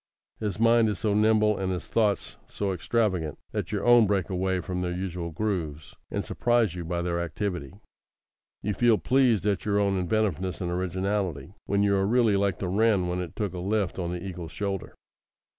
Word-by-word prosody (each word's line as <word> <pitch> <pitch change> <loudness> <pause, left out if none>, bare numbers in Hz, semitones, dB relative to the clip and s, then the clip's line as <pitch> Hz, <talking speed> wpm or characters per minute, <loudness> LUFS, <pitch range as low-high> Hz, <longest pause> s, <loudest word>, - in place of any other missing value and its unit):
His 105 -1 -3
mind 115 -1 +5
is 105 - -2
so 105 0 0
nimble 105 0 +3
and 95 -1 -1
his 90 -4 -3
thoughts 105 -3 0
so 100 -2 -2
extravagant, 90 -4 0
that - - -3
your - - -2
own 120 -3 +7
break 100 -1 0
away 95 0 0
from 90 +1 -3
their 90 -1 -1
usual 90 -1 -4
grooves, 80 - -3
and - - -3
surprise 120 -6 +1
you 90 -1 -5
by 85 +1 -2
their 85 -1 -1
activity. 85 -3 -3 0.9
You 105 - 0
feel 120 +1 +4
pleased 125 -7 +2
at 100 -2 +1
your 100 -1 +1
own 100 -2 +2
inventiveness 95 -1 -1
and 90 -2 -2
originality, 95 -2 -2
when 100 0 +2
you 100 -1 +3
are 95 0 +1
really 115 -2 +3
like 100 -3 +1
the 95 - -3
wren 100 -1 +2
when 90 +1 -1
it 90 - -7
took 105 -5 -2
a 90 - -5
lift 100 0 -1
on 85 -1 -2
the 90 0 -4
eagle's 90 -4 -6
shoulder. 100 +1 -4
95 Hz, 190 wpm, -27 LUFS, 90-105 Hz, 0.9 s, own